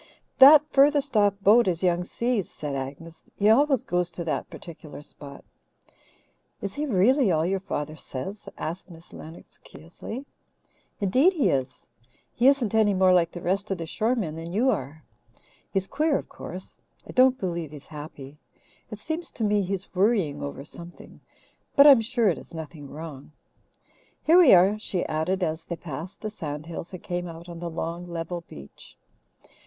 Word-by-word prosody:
"That 285 +2 +10
furthest 280 -1 +3
off 205 -2 +4
boat 220 +3 +6
is 175 -1 -1
Young 175 -1 +1
Si's," 235 -1 -1
said 145 -2 -6
Agnes. 140 +5 -7
"He 205 +1 +3
always 270 +2 +4
goes 180 -5 -1
to 175 - -6
that 165 - -3
particular 155 -3 -11
spot." 140 -1 -11 1.1
"Is 200 -1 -5
he 300 +4 -3
really 240 +2 +3
all 160 -1 +1
your 190 +2 0
father 155 -5 -4
says?" 160 +8 -7
asked 170 +4 -5
Miss 165 -1 -14
Lennox 160 +2 -12
curiously. 215 - -9 0.7
"Indeed, 255 - +3
he 275 - +2
is. 130 -4 -2 0.5
He 245 - +3
isn't 270 -7 +3
any 215 -2 +3
more 185 0 +4
like 170 -2 +3
the 175 - -9
rest 195 +3 -1
of 195 - -1
the 165 - -5
shore 225 +9 0
men 170 -10 -3
than 165 +1 -7
you 240 +8 +2
are. 155 - -5 0.7
He's 195 -1 0
queer, 305 -1 +1
of - - -7
course. 185 +2 -10 0.3
I - - -8
don't 260 +1 +4
believe 170 -5 -3
he's 150 -1 -12
happy. 150 -2 -10 0.5
It 215 - -7
seems 315 +10 -5
to 225 - -4
me 210 -1 +2
he's 195 0 -4
worrying 190 -7 +1
over 140 -1 -6
something, 170 +3 -11 0.6
but 280 - +8
I'm 275 -5 +9
sure 235 0 +1
it 180 - +1
is - - -12
nothing 155 -3 -8
wrong. 150 -2 -9 0.9
Here 335 +3 +6
we 310 - +8
are," 195 +4 +4
she 190 -4 -2
added, 180 +5 -1
as 160 0 -2
they 170 - -4
passed 165 +3 -8
the 215 - -4
sand 150 -6 -6
hills 165 0 -7
and 185 - -9
came 175 0 -3
out 165 +1 -10
on 170 -1 -8
the 170 0 -4
long, 170 +1 -5
level 170 0 -5
beach. 70 0 -13
180 Hz, 175 wpm, -25 LUFS, 160-220 Hz, 1.1 s, That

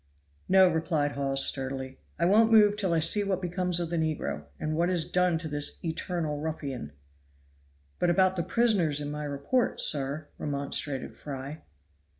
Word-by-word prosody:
"No," 190 0 +6
replied 160 -3 0
Hawes 135 -1 +1
sturdily, 130 -1 -2 0.2
"I 170 - +1
won't 220 +5 +4
move 210 -2 +6
till 195 -4 -1
I 165 - +2
see 165 +6 +4
what 195 -2 -1
becomes 180 -1 -1
of 170 -1 -3
the 170 - -1
negro, 155 - -2
and 155 0 -2
what 170 +2 +1
is 175 -3 +1
done 180 -2 +2
to 160 0 -3
this 145 -1 -1
eternal 160 -2 -3
ruffian." 140 - -5 1.1
"But 175 - +2
about 185 +2 +3
the 175 - -1
prisoners 185 -8 +1
in 145 0 -5
my 150 0 -5
report, 145 - -1
sir," 145 +1 +1
remonstrated 140 -1 -2
Fry. 140 +2 -7
160 Hz, 160 wpm, -28 LUFS, 145-180 Hz, 1.1 s, No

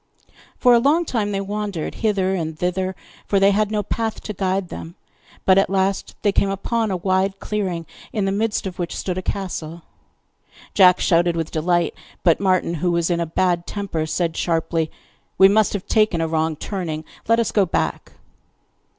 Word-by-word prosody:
For 245 - +5
a 235 - +6
long 305 +8 +3
time 215 -7 -1
they 195 -1 -1
wandered 200 -4 -3
hither 195 -4 +1
and 160 -4 -3
thither, 185 +2 -1 0.3
for 200 - +2
they 195 +1 +5
had 210 +1 +1
no 210 -1 -1
path 225 +2 -2
to 215 - -5
guide 190 -1 -1
them; 165 +2 -8 0.5
but 190 0 +6
at 195 - +1
last 195 0 0
they 205 - +4
came 200 0 +2
upon 220 +3 -1
a 190 - -1
wide 190 +2 0
clearing, 185 -6 -3 0.3
in 205 -3 -1
the 195 - +1
midst 210 +1 -1
of 185 -1 -6
which 175 -1 -3
stood 185 -1 -2
a - - -4
castle. 170 -4 -4 0.9
Jack 180 -2 +6
shouted 170 0 +2
with 165 -1 -3
delight, 170 +1 +1 0.3
but 170 -3 +4
Martin, 185 -3 +1
who 175 +2 -1
was 170 0 +1
in 170 - +1
a 170 - -1
bad 175 +1 0
temper, 190 -6 -3
said 165 0 -1
sharply: 165 -1 0 0.5
'We 190 0 +8
must 215 +1 +3
have 200 -3 -3
taken 215 -6 +2
a 165 - 0
wrong 160 0 0
turning! 160 -3 -4 0.2
Let 230 +1 +4
us 230 - 0
go 200 -3 +3
back. - - -2
190 Hz, 185 wpm, -21 LUFS, 170-205 Hz, 0.9 s, We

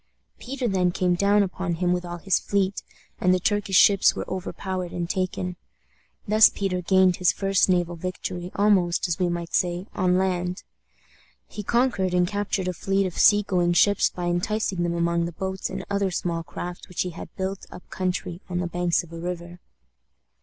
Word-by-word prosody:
Peter 255 0 -3
then 185 -3 +2
came 180 0 +1
down 200 +3 +3
upon 185 -2 -3
him 180 +1 +1
with 180 0 -2
all 175 0 -6
his 190 +1 +1
fleet, 200 -1 -1 0.4
and 180 - +3
the 185 - +3
Turkish 205 +1 0
ships 200 +1 +6
were - - -5
overpowered 185 -1 -4
and 175 -1 -3
taken. 185 -1 -2 0.7
Thus 215 +1 +7
Peter 185 -2 -2
gained 185 0 +3
his 180 - +3
first 195 -1 +1
naval 175 -1 +1
victory 180 0 -5
almost, 195 -4 +2
as 170 -2 -2
we 180 -1 +1
might 170 -1 -4
say, 175 +1 0
on 185 -2 +1
the - - +3
land. 180 -1 -1 0.8
He 210 - -7
conquered 205 -5 +1
and 180 0 +3
captured 205 -1 -2
a 180 - -1
fleet 195 +3 0
of 180 - -4
sea 205 0 +6
going 175 -3 +1
ships 200 +3 +4
by 180 - -5
enticing 180 +2 -1
them 170 0 0
among 170 0 +1
the 170 - -5
boats 190 +2 -4
and - - -5
other 200 -1 0
small 170 -2 -2
craft 175 +3 -7
which 180 - -3
he 180 - -2
had 170 - -9
built 190 +1 -4
up 180 - -12
country 180 -1 -3
on 180 - -2
the 180 - -1
banks 175 0 0
of 170 -1 -14
a 165 - -7
river. 175 0 -6
180 Hz, 190 wpm, -25 LUFS, 175-195 Hz, 0.8 s, Thus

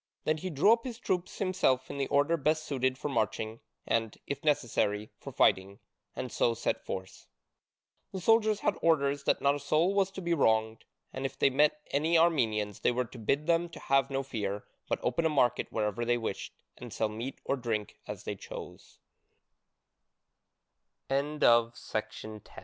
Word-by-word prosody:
Then 155 0 +1
he 185 +4 -4
drew 170 +8 +5
up 230 0 -1
his 245 -3 -6
troops 185 -6 -2
himself 185 -10 +1
in 140 - -6
the 135 - 0
order 145 +4 +3
best 155 +1 +1
suited 130 -3 -1
for 145 - -4
marching, 110 -3 -1 0.3
and, 115 -2 0
if 140 - -5
necessary, 115 -8 0
for - - -8
fighting, 95 +1 +2 0.4
and 125 - -4
so 115 - +1
set 115 - -2
forth. 95 0 -7 0.8
The 190 - -4
soldiers 215 +1 +3
had 205 - +1
orders 140 -3 +2
that - - +2
not 140 0 +5
a 145 - -3
soul 155 +6 +2
was 195 -1 +2
to - - -6
be 170 0 +1
wronged, 110 -6 +1 0.3
and 130 - -5
if 135 - -3
they - - +3
met 150 +2 +3
any 160 +4 +3
Armenians 110 - +2
they 120 - +2
were 125 +1 0
to 120 - -12
bid 140 +7 0
them 170 +1 +2
to 165 - -11
have 135 0 +2
no 135 0 -1
fear, 105 -6 -3 0.3
but - - +1
open 125 +7 0
a 160 - +3
market 135 -5 +1
wherever 105 +1 -1
they 120 +1 +2
wished, 115 - -5 0.2
and 120 -2 -8
se 110 +2 0
140 Hz, 155 wpm, -30 LUFS, 115-165 Hz, 0.8 s, drew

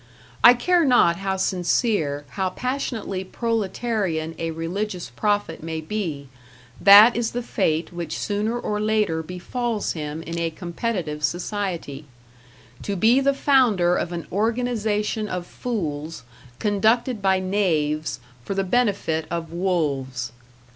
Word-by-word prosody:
I 245 - +10
care 350 +7 +3
not 245 - +4
how 195 0 -2
sincere, 180 - 0
how 190 -2 -1
passionately 235 -4 -3
proletarian 205 -6 -2
a 165 - -2
religious 175 - -4
prophet 205 - -1
may 160 0 -4
be, 160 -5 -4 0.5
that 205 +4 +9
is 235 -1 -1
the 245 0 -2
fate 165 -7 -1
which 175 -1 -4
sooner 215 +3 -1
or 210 -3 -2
later 210 -6 +1
befalls 210 +7 -3
him 155 0 -5
in 170 +1 -4
a 165 0 0
competitive 170 -2 -4
society 170 -3 -3 0.8
to 200 - -3
be 225 +7 +4
the 275 0 +2
founder 230 -12 +3
of 175 - -2
an 170 -1 -5
organization 220 0 0
of 180 -1 -3
fools, 165 - -4 0.3
conducted 220 +3 +1
by 190 -1 +3
knaves, 160 -7 0 0.2
for 195 - -4
the 195 - +1
benefit 195 -7 0
of 170 -1 -4
wolves. 140 -9 -1
190 Hz, 125 wpm, -23 LUFS, 165-220 Hz, 0.8 s, I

